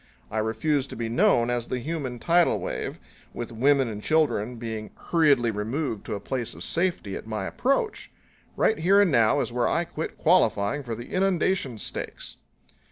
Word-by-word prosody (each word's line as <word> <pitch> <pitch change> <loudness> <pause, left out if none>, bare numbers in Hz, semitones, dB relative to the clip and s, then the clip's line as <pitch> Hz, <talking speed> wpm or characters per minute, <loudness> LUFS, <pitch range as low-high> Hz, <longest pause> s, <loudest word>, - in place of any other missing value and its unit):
I 110 - -1
refuse 130 +6 0
to - - -8
be 115 0 -3
known 120 0 +3
as 120 -1 -1
the 130 - -2
human 135 -2 -4
tidal 170 +7 +3
wave, - - -4 0.4
with 120 0 -5
women 135 +3 +3
and 105 -2 -5
children 135 -7 +1
being 110 -2 -5
hurriedly 140 -8 +2
removed 110 +2 -3
to - - -2
a - - -4
place 120 +2 -4
of - - -8
safety 170 - -1
at - - -8
my 110 -3 -3
approach. 275 - -1 0.5
Right 220 - +2
here 190 +5 +5
and 200 -4 +4
now 120 +2 +4
is - - -3
where 120 -1 +1
I 170 - +1
quit 165 -2 -6
qualifying 145 - +2
for 120 -4 -5
the 120 +2 -9
inundation 185 - +1
stakes!" - - -5
125 Hz, 175 wpm, -26 LUFS, 115-160 Hz, 0.5 s, here